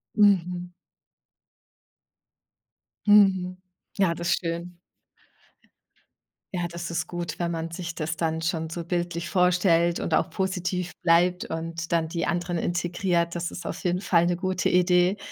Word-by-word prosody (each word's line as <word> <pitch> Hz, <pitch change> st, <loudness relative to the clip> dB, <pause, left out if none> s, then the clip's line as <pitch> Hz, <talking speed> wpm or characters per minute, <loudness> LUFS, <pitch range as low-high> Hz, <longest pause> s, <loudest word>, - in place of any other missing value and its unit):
Mhm. 180 Hz, -3 st, +2 dB, 2.3 s
Mhm. 190 Hz, -3 st, +5 dB, 0.4 s
Ja, 185 Hz, -4 st, +3 dB
das 170 Hz, +1 st, -2 dB
schön. 170 Hz, 0 st, -4 dB, 1.8 s
Ja, 175 Hz, -1 st, -1 dB
das 170 Hz, 0 st, -6 dB
ist 170 Hz, -, -2 dB
gut, 175 Hz, -1 st, -5 dB
wenn 170 Hz, -1 st, 0 dB
man 165 Hz, -1 st, -3 dB
sich 170 Hz, 0 st, -5 dB
das 160 Hz, 0 st, -3 dB
dann 160 Hz, -1 st, -1 dB
schon 165 Hz, -1 st, -1 dB
so 170 Hz, +1 st, -5 dB
bildlich 175 Hz, -1 st, -2 dB
vorstellt 180 Hz, -2 st, +3 dB
und 165 Hz, -, -2 dB
auch -, -, +2 dB
positiv 180 Hz, -2 st, -2 dB
bleibt 180 Hz, +1 st, +3 dB
und 165 Hz, +1 st, -5 dB
dann 165 Hz, -1 st, +2 dB
die 170 Hz, 0 st, -2 dB
anderen 175 Hz, 0 st, -1 dB
integriert. 175 Hz, 0 st, 0 dB
Das 170 Hz, 0 st, -2 dB
ist 175 Hz, -, -8 dB
auf 175 Hz, -, -5 dB
jeden 180 Hz, +1 st, 0 dB
Fall 170 Hz, -4 st, +3 dB
'ne 175 Hz, -, +1 dB
gute 185 Hz, 0 st, 0 dB
Idee. 180 Hz, +2 st, +3 dB
175 Hz, 135 wpm, -26 LUFS, 170-180 Hz, 2.3 s, Mhm